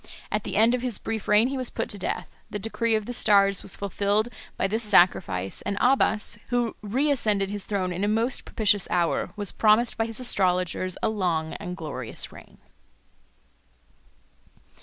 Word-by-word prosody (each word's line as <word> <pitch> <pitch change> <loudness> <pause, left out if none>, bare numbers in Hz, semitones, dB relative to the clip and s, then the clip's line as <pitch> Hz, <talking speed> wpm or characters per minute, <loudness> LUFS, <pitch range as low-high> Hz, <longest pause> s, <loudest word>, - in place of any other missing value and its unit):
At 210 -1 -2
the - - -4
end 225 +3 +4
of 250 - -1
his 245 -4 +1
brief 220 -2 -5
reign 220 +4 +4
he 275 - -3
was 255 -2 0
put 225 - -3
to 205 - -1
death: - - -4
the - - -4
decree 225 +2 -1
of 215 -1 -2
the 245 - -5
stars 200 -4 +4
was - - -4
fulfilled 200 +3 -1 0.3
by - - 0
this 215 +4 -1
sacrifice; 105 - +2
and 200 - -3
Abbas, 220 -5 +2
who 240 -2 0
reascended 215 -4 0
his 205 -1 -4
throne 185 -3 -2
in 180 +3 -3
a - - +2
most 225 +4 0
propitious 205 -3 0
hour, 175 -1 0
was 205 -2 0
promised 220 +2 +3
by 225 - 0
his 225 0 -7
astrologers 185 -5 +1
a - - +2
long 175 -7 -1
and 180 -2 -6
glorious 135 -8 -5
reign. - - -15
210 Hz, 175 wpm, -25 LUFS, 185-225 Hz, 0.3 s, end